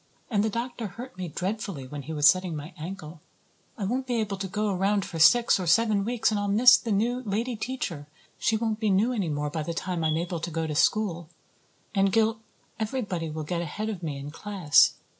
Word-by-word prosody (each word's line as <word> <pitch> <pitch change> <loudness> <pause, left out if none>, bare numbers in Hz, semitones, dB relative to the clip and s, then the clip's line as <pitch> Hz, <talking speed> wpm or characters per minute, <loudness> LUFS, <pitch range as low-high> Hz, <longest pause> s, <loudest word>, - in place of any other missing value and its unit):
And 205 -2 +2
the 220 - +1
doctor 235 +1 -4
hurt 235 +6 -9
me 185 -1 -5
dreadfully 190 -3 -4
when 145 +2 -7
he 150 - -8
was 150 -2 +4
setting 185 +1 +3
my 150 +4 -7
ankle. 165 -2 -8 0.6
I 205 - -3
won't 255 +6 -2
be 245 - -1
able 210 -3 -2
to 190 0 -4
go 210 +2 -1
around 195 +2 +1
for 165 - -6
six 215 +8 +6
or 180 - -3
seven 215 +2 +3
weeks 235 +1 +1
and 210 - 0
I'll 205 - -1
miss 240 +5 +7
the 235 -2 -2
new 235 +5 +1
lady 230 +3 -2
teacher. 210 - -4 0.3
She 220 - +2
won't 220 -1 -1
be 215 -2 +1
new 205 +6 +2
any 200 -8 -1
more 150 0 -2
by 160 - -2
the 165 +2 -4
time 175 -1 -2
I'm 155 0 +1
able 170 0 -3
to 170 - -4
go 165 0 -2
to 155 - -3
school. 170 0 +1 0.6
And 195 -1 +3
Gil 225 +1 +2 0.4
everybody 210 -8 -2
will 155 0 -5
get 170 +3 -2
ahead 210 +7 -4
of 200 -5 -5
me 150 -4 -4
in 140 +1 -7
class. 185 -4 +3
195 Hz, 220 wpm, -27 LUFS, 165-220 Hz, 0.6 s, miss